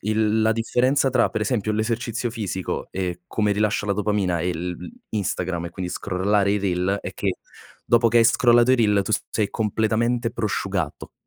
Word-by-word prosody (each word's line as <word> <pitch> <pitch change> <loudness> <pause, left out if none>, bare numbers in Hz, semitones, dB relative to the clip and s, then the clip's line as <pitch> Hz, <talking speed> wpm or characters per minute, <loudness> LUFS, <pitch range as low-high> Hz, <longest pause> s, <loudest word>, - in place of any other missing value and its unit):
il 110 +1 +1
la 110 0 +3
differenza 125 +5 +1
tra 125 -2 +3
per - - -3
esempio, 110 -1 -1
l'esercizio 115 +2 -2
fisico 100 -5 -4
e 90 -2 -4
come 105 -2 0
rilascia 105 0 0
la 100 - +1
dopamina 100 -4 0
e 90 +1 -1
l 90 +2 -3
l - - -9 0.2
Instagram, 90 -4 -2
e - - -8
quindi 90 0 -5
scrollare 100 +2 0
i 105 - +1
reel 95 0 0
è - - -5
che, - - -2 0.5
dopo 120 0 +4
che 120 +1 +4
hai 115 - +5
scrollato 120 +1 +5
i - - +5
reel 105 -4 +3
tu 110 - -3 0.2
sei 105 -3 0
completamente 115 +2 0
prosciugato. 95 -7 -3
105 Hz, 180 wpm, -23 LUFS, 95-115 Hz, 0.5 s, hai